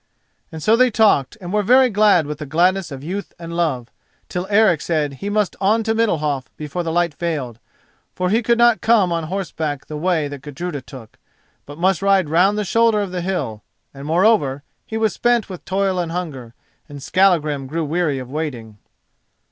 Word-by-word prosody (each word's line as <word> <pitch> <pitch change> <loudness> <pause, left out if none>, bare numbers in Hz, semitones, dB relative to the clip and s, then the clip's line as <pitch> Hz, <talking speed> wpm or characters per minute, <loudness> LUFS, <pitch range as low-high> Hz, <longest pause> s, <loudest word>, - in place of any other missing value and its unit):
And 160 -1 -8
so 220 - +4
they 255 +2 +4
talked 215 - +2
and 180 -1 -7
were 210 - +2
very 250 +4 +4
glad 205 -6 +4
with 150 0 -6
the 150 - -6
gladness 180 +4 +1
of 135 0 -8
youth 190 +6 -5
and 170 0 -7
love, 135 -9 -1 0.4
till 180 +1 -4
Eric 205 -6 +4
said 150 -4 -1
he 200 - -3
must 210 -2 0
on 215 +4 +2
to 225 0 0
Middalhof 155 - 0
before 150 +3 -4
the 165 -1 -3
light 170 -1 +1
failed, 145 -9 -4 0.6
for 180 0 -1
he 225 +3 +3
could 235 0 +2
not 235 -1 +4
come 215 -6 +3
on 165 -1 -1
horseback 160 -5 -4
the 155 - -7
way 165 -2 0
that 145 -2 -8
Gudruda 145 +2 -6
took, 125 -4 -13 0.5
but 145 +1 -10
must 185 0 +1
ride 195 -5 +2
round 185 +6 +3
the 210 - -1
shoulder 230 +1 +3
of 200 -3 -4
the 180 -1 -3
hill; 170 - -3 0.3
and, 140 +1 -9
moreover, 160 -6 +2 0.2
he 220 - -4
was 220 -1 +1
spent 240 -3 +1
with 180 - -8
toil 190 -1 0
and 170 -2 -2
hunger, 140 -10 -6 0.3
and 145 - -9
Skallagrim 155 -6 +2
grew 160 +3 -2
weary 155 -2 0
of 130 -1 -7
waiting. 125 -9 -5
175 Hz, 195 wpm, -20 LUFS, 145-200 Hz, 0.6 s, so